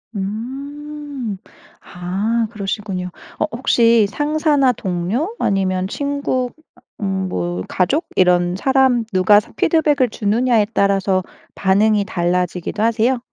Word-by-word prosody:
음. 270 Hz, +3 st, -5 dB, 0.4 s
아. 200 Hz, +6 st, -2 dB
그러시군요. 195 Hz, -3 st, -4 dB, 0.3 s
어 -, -, +2 dB
혹시 230 Hz, -3 st, +3 dB
상사나 295 Hz, 0 st, +2 dB
동료 205 Hz, -, -2 dB
아니면 190 Hz, -1 st, 0 dB
친구, 280 Hz, -1 st, -2 dB
음 315 Hz, -, -27 dB
아 -, -, -23 dB, 0.2 s
음 190 Hz, -1 st, -1 dB
뭐 90 Hz, -, -2 dB
가족 275 Hz, -, 0 dB
이런 180 Hz, -1 st, +3 dB
사람 260 Hz, +1 st, +2 dB
누가 185 Hz, +3 st, +5 dB
삼 -, -, -12 dB
피드백을 295 Hz, -6 st, +2 dB
주느냐에 220 Hz, +1 st, +1 dB
따라서 195 Hz, -2 st, +2 dB, 0.3 s
반응이 205 Hz, +2 st, +2 dB
달라지기도 180 Hz, +1 st, -1 dB
하세요? 230 Hz, +3 st, +2 dB
215 Hz, 250 characters per minute, -19 LUFS, 190-265 Hz, 0.4 s, 누가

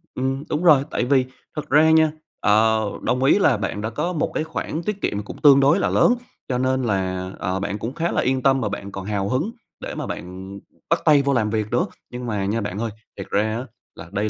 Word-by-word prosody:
ừm, 135 Hz, +2 st, -2 dB
đúng 150 Hz, +3 st, -1 dB
rồi, 150 Hz, -6 st, +6 dB
tại -, -, 0 dB
vì 130 Hz, 0 st, +3 dB, 0.3 s
thật 150 Hz, -1 st, -5 dB
ra 155 Hz, +3 st, +5 dB
nha, 160 Hz, -1 st, +5 dB, 0.3 s
ờ, 110 Hz, +1 st, +3 dB, 0.2 s
đồng 125 Hz, +1 st, 0 dB
ý 140 Hz, +9 st, +5 dB
là 145 Hz, -, +4 dB
bạn 105 Hz, 0 st, -3 dB
đã 110 Hz, -, -2 dB
có 150 Hz, +10 st, -2 dB
một 155 Hz, -, -1 dB
cái -, -, -1 dB
khoản 160 Hz, 0 st, -4 dB
tiết 200 Hz, +2 st, -3 dB
kiệm 105 Hz, 0 st, -1 dB
cũng -, -, -10 dB
tương 140 Hz, -3 st, +7 dB
đối 140 Hz, +7 st, +4 dB
là -, -, +1 dB
lớn, 245 Hz, -, +4 dB, 0.3 s
cho 125 Hz, -, -1 dB
nên 130 Hz, +1 st, +1 dB
là, 95 Hz, -4 st, -1 dB
ờ, 95 Hz, -1 st, -1 dB
bạn 100 Hz, +1 st, -3 dB
cũng 115 Hz, +5 st, -4 dB
khá 170 Hz, +4 st, -1 dB
là -, -, +1 dB
yên 130 Hz, +1 st, 0 dB
tâm 135 Hz, -1 st, +3 dB
mà 105 Hz, -, -1 dB
bạn 100 Hz, -1 st, -6 dB
còn 95 Hz, -1 st, -6 dB
hào 100 Hz, -1 st, -1 dB
hứng 155 Hz, -, 0 dB, 0.3 s
để -, -, -6 dB
mà -, -, -4 dB
bạn 95 Hz, +2 st, -7 dB, 0.3 s
bắt -, -, +3 dB
tay 150 Hz, -2 st, +6 dB
vô 140 Hz, 0 st, +1 dB
làm 110 Hz, -4 st, +1 dB
việc 110 Hz, -1 st, -1 dB
nữa, 120 Hz, -, +2 dB, 0.2 s
nhưng 125 Hz, 0 st, -6 dB
mà 105 Hz, -4 st, -2 dB
nha 110 Hz, +4 st, -1 dB
bạn 100 Hz, -1 st, -4 dB
ơi, 115 Hz, -1 st, -2 dB, 0.3 s
thiệt 100 Hz, -, -6 dB
ra 110 Hz, +2 st, +1 dB
á, 125 Hz, -, -5 dB, 0.3 s
là 85 Hz, -, -10 dB
đây 105 Hz, +2 st, -1 dB
120 Hz, 250 wpm, -22 LUFS, 105-140 Hz, 0.3 s, tương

